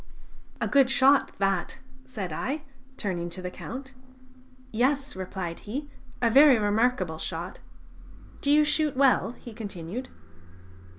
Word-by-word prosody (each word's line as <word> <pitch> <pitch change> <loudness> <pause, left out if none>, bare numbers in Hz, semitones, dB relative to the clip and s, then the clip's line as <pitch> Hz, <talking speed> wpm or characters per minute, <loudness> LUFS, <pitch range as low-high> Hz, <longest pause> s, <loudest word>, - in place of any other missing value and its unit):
"A - - 0
good 275 -2 +4
shot 270 +1 +4
that!" 195 +1 0 0.3
said 200 -10 -5
I, 285 - -3 0.3
turning 175 -4 -3
to 175 - -6
the 180 - -4
Count. 265 +7 -8 0.8
"Yes," 270 +5 +1
replied 185 -2 -5
he, 280 +7 -6 0.3
"a 230 - +5
very 275 0 +8
remarkable 205 -5 +1
shot.... 170 +4 -5 0.8
Do 280 - -1
you 300 +1 +6
shoot 300 -2 +1
well?" 260 -3 +3
he 240 -2 -11
continued. 205 +2 -6
235 Hz, 125 wpm, -27 LUFS, 185-275 Hz, 0.8 s, very